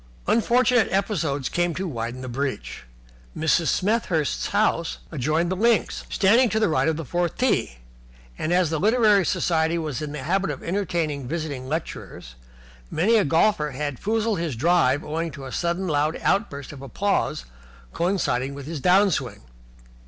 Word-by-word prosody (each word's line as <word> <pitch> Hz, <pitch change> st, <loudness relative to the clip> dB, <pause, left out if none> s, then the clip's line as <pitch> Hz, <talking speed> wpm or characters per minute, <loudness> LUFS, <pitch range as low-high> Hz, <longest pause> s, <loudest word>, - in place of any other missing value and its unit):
Unfortunate 240 Hz, 0 st, +3 dB
episodes 165 Hz, -, -1 dB
came 175 Hz, -2 st, -1 dB
to 190 Hz, 0 st, -3 dB
widen 120 Hz, -3 st, -4 dB
the 130 Hz, -, -6 dB
breach. 120 Hz, -, -4 dB, 0.5 s
Mrs. 160 Hz, +1 st, +2 dB
Smethurst's 185 Hz, -7 st, 0 dB
house 200 Hz, -5 st, 0 dB
adjoined 155 Hz, +4 st, 0 dB
the -, -, 0 dB
links, 230 Hz, +3 st, +1 dB
standing 230 Hz, +5 st, +4 dB
to 220 Hz, -, 0 dB
the 215 Hz, -, +2 dB
right 160 Hz, -, +1 dB
of 160 Hz, -1 st, +1 dB
the 165 Hz, -, -5 dB
fourth 175 Hz, +5 st, -1 dB
tee: 240 Hz, -, 0 dB, 0.6 s
and, 155 Hz, -, -3 dB
as 175 Hz, -2 st, +2 dB
the 160 Hz, -, -1 dB
Literary 215 Hz, -1 st, +4 dB
Society 165 Hz, -1 st, +1 dB
was 155 Hz, -6 st, -3 dB
in 150 Hz, -1 st, -4 dB
the 145 Hz, -3 st, -6 dB
habit 190 Hz, +6 st, 0 dB
of -, -, -5 dB
entertaining 165 Hz, -7 st, -2 dB
visiting 145 Hz, -4 st, -4 dB
lecturers, 150 Hz, -, -6 dB, 0.6 s
many 195 Hz, +9 st, +2 dB
a 215 Hz, -, +4 dB
golfer 160 Hz, 0 st, +2 dB
had 145 Hz, -1 st, -4 dB
foozled 220 Hz, -2 st, 0 dB
his 165 Hz, -6 st, -2 dB
drive 145 Hz, 0 st, +2 dB
owing 165 Hz, +2 st, -3 dB
to 135 Hz, -3 st, -9 dB
sudden 175 Hz, +5 st, -1 dB
loud 150 Hz, 0 st, 0 dB
outbursts 150 Hz, -9 st, -1 dB
of 135 Hz, -, -11 dB
applause 140 Hz, -, -1 dB, 0.5 s
coinciding 140 Hz, -8 st, 0 dB
with 140 Hz, -1 st, -8 dB
his 160 Hz, 0 st, -5 dB
down 190 Hz, +6 st, +4 dB
swing. 125 Hz, -10 st, -3 dB
165 Hz, 160 wpm, -24 LUFS, 140-195 Hz, 0.6 s, standing